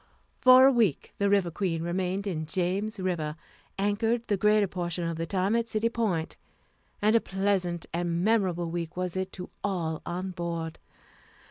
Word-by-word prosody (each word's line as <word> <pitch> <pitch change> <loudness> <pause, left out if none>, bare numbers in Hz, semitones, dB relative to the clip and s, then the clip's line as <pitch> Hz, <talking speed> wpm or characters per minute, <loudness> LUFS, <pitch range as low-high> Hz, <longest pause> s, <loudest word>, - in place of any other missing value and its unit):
For 255 0 +8
a 270 - +7
week 225 - +1
the 200 0 +2
River 195 -4 +2
Queen 165 -2 -1
remained 185 +3 -1
in 160 -6 -3
James 195 +5 -1
River, 170 -5 -2 0.4
anchored 225 +4 0
the 205 - +2
greater 210 +1 +4
portion 175 -2 -3
of 165 - -2
the 165 +1 -3
time 195 +4 +1
at 230 0 0
City 220 +1 +1
Point, 200 -9 -1 0.7
and 215 +2 +4
a 230 - +5
pleasant 190 -3 -1
and 170 0 -1
memorable 185 -6 +1
week 170 0 -4
was 180 -1 -2
it 190 0 -2
to 180 -1 -8
all 170 -5 -2
on 185 +2 -4
board. 170 -2 -4
185 Hz, 165 wpm, -28 LUFS, 170-205 Hz, 0.7 s, For